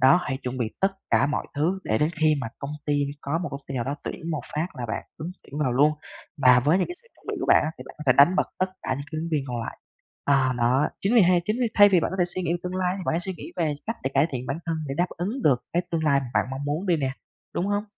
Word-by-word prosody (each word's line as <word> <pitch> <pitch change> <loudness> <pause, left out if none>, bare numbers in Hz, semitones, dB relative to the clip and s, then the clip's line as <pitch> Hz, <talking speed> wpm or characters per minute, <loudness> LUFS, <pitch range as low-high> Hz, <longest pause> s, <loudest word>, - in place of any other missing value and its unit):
Đó, 135 +7 +7
hãy 130 - -2
chuẩn 125 +1 -4
bị 120 - +1
tất 195 0 +3 0.2
cả 120 +4 +4
mọi 150 - -2
thứ 165 +7 +1
để 110 - +1
đến 150 +2 +2
khi 155 -1 +5
mà 115 - -3
công 140 - -5 0.2
ty 145 - +2 0.3
có 140 +4 -1
một 175 - -3
công 140 - -6
ty 135 - -6
nào 120 - -1
đó 140 +3 -2
tuyển 165 - -5
một 155 -3 -1
phát 155 +3 0
là 120 -2 -4
bạn 115 - -3
ứng 160 +3 -5
tuyển 145 - -8
vào 130 -4 +1
luôn, 145 +5 +5 0.5
và 125 -1 +7
với 150 +8 +3
những 185 - +1
cái 350 - -5
sự 470 - -25
chuẩn - - -27
bị 430 - -1
của 365 - -2
bạn - - +6
á 155 - -1
thì - - -8
bạn - - -11
có - - -6
thể 130 - +7
đánh 145 +8 +6
bật - - +2
tất 185 0 +1
cả 130 - -1
những 140 +2 -5
cái 155 - -2
ứng 165 - -3
viên 145 -3 +1
còn 120 -1 -2
lại. - - -5 0.5
À 135 -2 +3
đó, 125 +4 +3
chính 200 +5 +1
vì 235 - +8
hay 180 -2 +5
chính 215 +4 0
vì 245 - +3
thay 205 0 +8
vì 185 -3 +4
bạn - - -1
có 190 - -4
thể 180 - +4
suy 180 +1 -4
nghĩ 175 - -1
về - - +1
tương 180 0 -4
lai 185 -1 +1
thì - - -5
bạn - - +2
hãy 165 - +1
suy 190 +1 -3
nghĩ - - -9
về 160 -4 +1
cách 225 - -2
để 135 - -1
cải 140 +3 +5
thiện 130 -1 -4
bản 135 +5 -2
thân, 165 -1 0
để 135 - -2
đáp 175 - +3
ứng 210 +10 -3
được 125 -4 +3
cái 175 - +2
tương 165 -2 -1
lai 140 -2 +4
bạn - - +3
mong 135 +1 -4
muốn 150 +7 -2
đi 175 - +3
nè, 135 -4 -1 0.4
đúng 180 - 0
hông? 205 +1 0
155 Hz, 320 wpm, -25 LUFS, 135-180 Hz, 0.5 s, vì